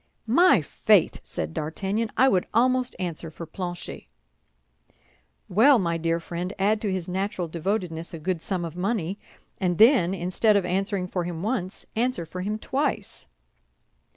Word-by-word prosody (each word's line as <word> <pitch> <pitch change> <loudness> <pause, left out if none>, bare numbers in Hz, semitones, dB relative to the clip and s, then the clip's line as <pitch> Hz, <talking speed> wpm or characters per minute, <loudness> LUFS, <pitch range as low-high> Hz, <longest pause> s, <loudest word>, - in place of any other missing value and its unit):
"My 250 - +5
faith," 200 +4 +3
said 80 0 -5
D'Artagnan. 195 +8 -2
"I 260 +3 +6
would 185 -8 +2
almost 255 +1 +2
answer 170 -3 -4
for 165 +2 -8
Planchet." 175 +1 -6 1.4
"Well, 245 +9 +6
my 170 -5 0
dear 165 +1 0
friend, 175 +2 -5
add 210 +2 +2
to 205 - -1
his 185 -2 -3
natural 185 -1 -2
devotedness 170 0 -3
a 165 - -6
good 170 +1 -2
sum 180 -2 -2
of 165 -1 -7
money, 195 0 -2 0.4
and 180 -3 0
then, 220 -6 +5
instead 195 +4 +2
of 195 - 0
answering 190 +1 -1
for 180 -1 -2
him 170 -1 -5
once, 205 -4 -3
answer 235 -6 0
for 180 +3 -6
him 210 +3 -2
twice." 275 +6 -3
185 Hz, 155 wpm, -25 LUFS, 170-215 Hz, 1.4 s, I